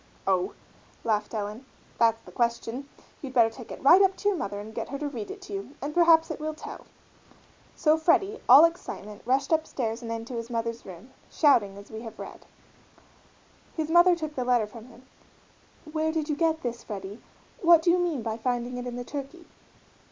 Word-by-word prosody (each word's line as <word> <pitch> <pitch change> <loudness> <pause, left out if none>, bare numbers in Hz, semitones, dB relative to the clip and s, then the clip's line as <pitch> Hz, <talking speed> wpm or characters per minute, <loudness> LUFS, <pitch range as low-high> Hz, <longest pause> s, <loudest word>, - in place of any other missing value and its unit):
"Oh," 190 0 +1 0.5
laughed 215 -2 0
Ellen, 210 +3 -4 0.4
"that's 225 -1 +4
the - - -13
question! 235 +3 -2 0.3
You'd 265 -3 -7
better 230 -2 +5
take 230 0 -11
it - - -9
right 345 +8 +8
up 385 -1 +4
to 410 - +1
your 405 - 0
mother 205 0 -4
and 215 +2 -9
get - - -5
her 275 - -4
to 295 +1 -3
read 235 -7 -6
it 395 -1 -8
to 400 - -9
you 390 -8 -6
and 290 +2 -4
perhaps 330 -1 +5
it - - -5
will 310 0 -4
tell." - - -10 0.9
So 310 0 +3
Freddie, 390 +6 +2
all 275 +6 +10
excitement, 210 - -5
rushed 265 +5 +1
upstairs 255 -8 -1
and 230 -1 -6
into 230 +2 -5
his 230 0 -5
mother's 230 -1 -3
room, 190 +7 -11 0.2
shouting 225 -10 +3
as 200 +2 -13
we 220 0 -7
have 225 -2 -9
read. - - -10 1.3
His 315 0 -2
mother 345 +1 +6
took 310 -3 -5
the 255 - -2
letter 245 -3 +2
from 220 +2 -12
him. 250 +1 -17 0.9
"Where 315 0 0
did 315 -1 -2
you 300 - +1
get 320 0 0
this, 235 -1 -4
Freddie 200 0 -7 0.4
what 335 -2 +6
do 345 - +4
you 360 - +3
mean 330 -9 -1
by 220 -1 -3
finding 245 +1 -2
it 245 0 -5
in 245 - -5
the 245 0 -5
turkey?" 290 +6 -7
255 Hz, 200 wpm, -27 LUFS, 225-315 Hz, 1.3 s, all